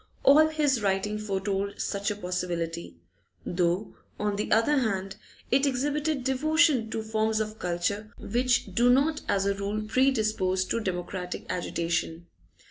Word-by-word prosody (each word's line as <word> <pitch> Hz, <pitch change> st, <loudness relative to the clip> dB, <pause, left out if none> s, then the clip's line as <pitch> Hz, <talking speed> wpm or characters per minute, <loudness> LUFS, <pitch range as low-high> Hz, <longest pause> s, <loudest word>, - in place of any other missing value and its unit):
All 305 Hz, +3 st, +7 dB
his 295 Hz, -6 st, +1 dB
writing 205 Hz, +1 st, 0 dB
foretold 200 Hz, -1 st, -2 dB
such 200 Hz, +1 st, -1 dB
a 210 Hz, -, -2 dB
possibility, 175 Hz, -, -3 dB, 0.5 s
though 180 Hz, +3 st, 0 dB, 0.3 s
on 210 Hz, -1 st, 0 dB
the 210 Hz, -, -3 dB
other 230 Hz, +7 st, +4 dB
hand 195 Hz, -4 st, -2 dB, 0.3 s
it 275 Hz, +2 st, +4 dB
exhibited 290 Hz, +2 st, -1 dB
devotion 275 Hz, -2 st, +2 dB
to 220 Hz, 0 st, -3 dB
forms 220 Hz, 0 st, 0 dB
of 215 Hz, 0 st, -4 dB
culture 180 Hz, +5 st, -2 dB
which 245 Hz, +3 st, 0 dB
do 240 Hz, +1 st, +4 dB
not 285 Hz, +5 st, +3 dB
as 195 Hz, 0 st, +2 dB
a 200 Hz, -, +2 dB
rule 200 Hz, +2 st, -3 dB
predispose 215 Hz, -6 st, +1 dB
to 230 Hz, -, -1 dB
democratic 180 Hz, -2 st, -4 dB
agitation. 170 Hz, -1 st, -2 dB
215 Hz, 135 wpm, -27 LUFS, 190-255 Hz, 0.5 s, All